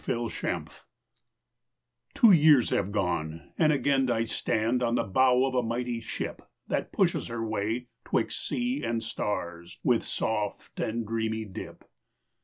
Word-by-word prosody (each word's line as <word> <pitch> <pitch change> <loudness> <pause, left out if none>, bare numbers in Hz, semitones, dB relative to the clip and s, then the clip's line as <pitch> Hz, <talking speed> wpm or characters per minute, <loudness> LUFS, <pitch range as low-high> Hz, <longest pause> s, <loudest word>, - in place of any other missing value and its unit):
RE - - +1
RECKONING - - -3 1.5
Two 230 -5 +7
years 150 -7 +6
have 100 0 0
gone, 85 -5 -2
and 155 -2 +4
again 135 -2 +2
I 115 -1 +2
stand 115 +2 0
On 120 -1 +1
the - - +2
bow 125 +5 +4
of 135 - -2
a 125 - +3
mighty 120 +1 -2
ship - - -5 0.3
That - - -2
pushes - - +1
her 115 -1 -3
way 110 +3 -2 0.2
'twixt - - -1
sea 125 +3 -1
and 115 0 -1
stars 85 -6 -4
With 120 -3 +3
soft 105 -2 -3
and 115 +1 -1
dreamy 110 0 -2
dip. 95 - -9
115 Hz, 145 wpm, -28 LUFS, 105-125 Hz, 1.5 s, Two